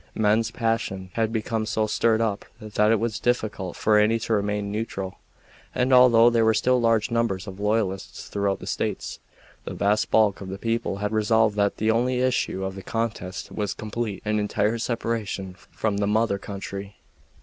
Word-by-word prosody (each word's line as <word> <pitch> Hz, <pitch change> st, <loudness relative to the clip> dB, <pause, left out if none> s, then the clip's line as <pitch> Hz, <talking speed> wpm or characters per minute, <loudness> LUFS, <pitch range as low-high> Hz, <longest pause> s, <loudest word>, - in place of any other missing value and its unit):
Men's 110 Hz, +2 st, +2 dB
passions 115 Hz, -6 st, -2 dB
had 115 Hz, -1 st, 0 dB
become 110 Hz, -1 st, -2 dB
so 110 Hz, -1 st, 0 dB
stirred 110 Hz, +1 st, +2 dB
up 105 Hz, -3 st, -1 dB, 0.2 s
that 105 Hz, -1 st, +1 dB
it 115 Hz, -, +3 dB
was 110 Hz, -1 st, -2 dB
difficult 110 Hz, -7 st, -1 dB
for 105 Hz, -1 st, +3 dB
any 110 Hz, +2 st, +3 dB
to 115 Hz, -, -1 dB
remain 105 Hz, -1 st, -1 dB
neutral; 100 Hz, -3 st, -4 dB, 0.6 s
and 130 Hz, +1 st, +2 dB
although 120 Hz, -2 st, +7 dB
there 115 Hz, -1 st, +3 dB
were 110 Hz, 0 st, +4 dB
still 125 Hz, +3 st, +2 dB
large 115 Hz, -2 st, +2 dB
numbers 115 Hz, -5 st, 0 dB
of 95 Hz, -1 st, -9 dB
loyalists 105 Hz, -2 st, -1 dB
throughout 100 Hz, -1 st, -1 dB
the -, -, -9 dB
States, -, -, -3 dB, 0.4 s
the -, -, -6 dB
vast 105 Hz, +2 st, +1 dB
bulk 105 Hz, -3 st, +3 dB
of 95 Hz, -, -7 dB
the 95 Hz, -, -5 dB
people 115 Hz, -1 st, -1 dB
had 105 Hz, +1 st, -2 dB
resolved 110 Hz, 0 st, +2 dB
that 100 Hz, -1 st, +1 dB
the 110 Hz, +1 st, +2 dB
only 125 Hz, +2 st, +1 dB
issue 125 Hz, -6 st, 0 dB
of 95 Hz, -, -3 dB
the 95 Hz, -, -8 dB
contest 105 Hz, -3 st, -4 dB
was 105 Hz, -2 st, -3 dB
complete 110 Hz, -1 st, -4 dB
and 105 Hz, 0 st, +1 dB
entire 105 Hz, +2 st, 0 dB
separation 110 Hz, -5 st, -3 dB, 0.2 s
from 105 Hz, -2 st, -2 dB
the 100 Hz, 0 st, 0 dB
mother 105 Hz, -1 st, +1 dB
country. 100 Hz, 0 st, -7 dB
110 Hz, 180 wpm, -25 LUFS, 100-115 Hz, 0.6 s, although